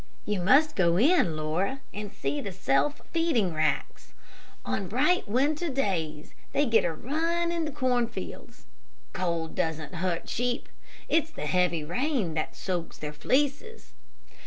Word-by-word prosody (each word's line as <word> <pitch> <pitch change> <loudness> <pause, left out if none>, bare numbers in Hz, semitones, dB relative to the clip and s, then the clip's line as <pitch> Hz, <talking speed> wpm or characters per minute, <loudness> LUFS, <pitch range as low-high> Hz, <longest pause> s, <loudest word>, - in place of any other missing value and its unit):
You 210 -2 0
must 280 - +5
go 170 -2 +3
in, 235 - +4
Laura, 170 - -1
and 205 -1 -5
see 140 +1 -2
the 200 - -5
self 185 - +1
feeding 295 - +2
racks. 155 - -1 0.5
On 115 - -2
bright, 290 - +2
winter 290 +9 +1
days 170 - -2 0.2
they 290 - +3
get 230 -3 +4
a 170 - +1
run 330 - -1
in 335 -2 -1
the 305 - -3
cornfields. 250 -4 -2 0.5
Cold 170 -3 -2
doesn't 160 0 -2
hurt 175 -1 -2
sheep. 245 +1 -1 0.4
It's 320 -1 +2
the 320 - -6
heavy 180 -3 +2
rain 235 - 0
that 155 0 -2
soaks 175 -3 -3
their 150 0 -5
fleeces. 290 - -1
210 Hz, 140 wpm, -28 LUFS, -, 0.5 s, must